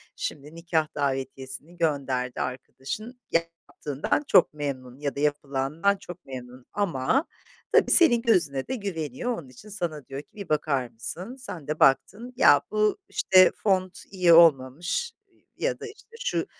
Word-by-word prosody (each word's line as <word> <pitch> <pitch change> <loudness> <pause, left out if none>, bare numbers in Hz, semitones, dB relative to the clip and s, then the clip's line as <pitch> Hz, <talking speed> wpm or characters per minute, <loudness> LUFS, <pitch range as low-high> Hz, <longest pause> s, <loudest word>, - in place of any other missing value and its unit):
Şimdi, 150 +2 -6
nikâh 165 -2 0
davetiyesini 135 +3 -4
gönderdi 135 -6 -1
arkadaşın, 135 - -6
yaptığından 165 - -2
çok 175 - +5
memnun 135 -3 -5
ya 145 -1 -3
da 140 - -5
yapılandan 150 +6 0
çok 180 -1 -11
memnun, 125 -1 -9
ama 200 - 0 0.5
tabii - - +4
senin 240 -10 +7
gözüne 155 - +1
de 260 - -2
güveniyor. 180 - -4
Onun 135 -6 -10
için 165 - -15
sana 170 -8 -4
diyor 135 +2 -6
ki, 150 - -32
"Bir 200 -2 -8
bakar 140 -5 0
mısın?" 170 - -6
Sen 200 - -9
de 150 +1 -3
baktın, 205 - +2
"Ya, 145 - +6
bu, 215 0 +2
işte, 185 -1 +5
font 185 -3 0
iyi 180 -3 +4
olmamış, 165 - +4 0.2
ııı, - - -32 0.2
ya - - -1
da, - - -7
işte, 450 +2 -15
şu - - -1
155 Hz, 150 wpm, -26 LUFS, 135-200 Hz, 0.5 s, senin